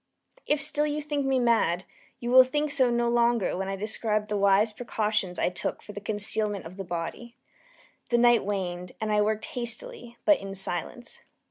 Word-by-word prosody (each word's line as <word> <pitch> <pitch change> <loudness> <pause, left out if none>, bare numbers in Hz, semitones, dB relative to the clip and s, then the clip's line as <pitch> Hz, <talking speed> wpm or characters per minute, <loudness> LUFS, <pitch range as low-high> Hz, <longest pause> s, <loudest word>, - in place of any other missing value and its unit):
If 295 - +2
still 300 +1 +2
you 300 0 -2
think 290 -2 -2
me 265 -1 +2
mad, 225 -8 +2 0.4
you 240 -1 -3
will 260 +1 +9
think 295 +3 -1
so 265 -4 +3
no 240 0 +1
longer 235 -3 +2
when 190 +1 -3
I 195 - -2
describe 215 +1 -2
the 210 - -1
wise 200 +2 +3
precautions 210 -5 -2
I - - +1
took 180 - -4
for - - -9
the 205 - -7
concealment 205 -1 -1
of 170 +3 -9
the 195 - -4
body. 175 +7 -6 0.7
The 240 - +3
night 240 -1 +5
waned, 180 -3 -4
and 215 -1 -2
I 210 0 +3
worked 215 +1 0
hastily, 240 0 -3
but 310 -2 +5
in 195 0 -7
silence. 190 +5 -4
220 Hz, 190 wpm, -27 LUFS, 195-245 Hz, 0.7 s, will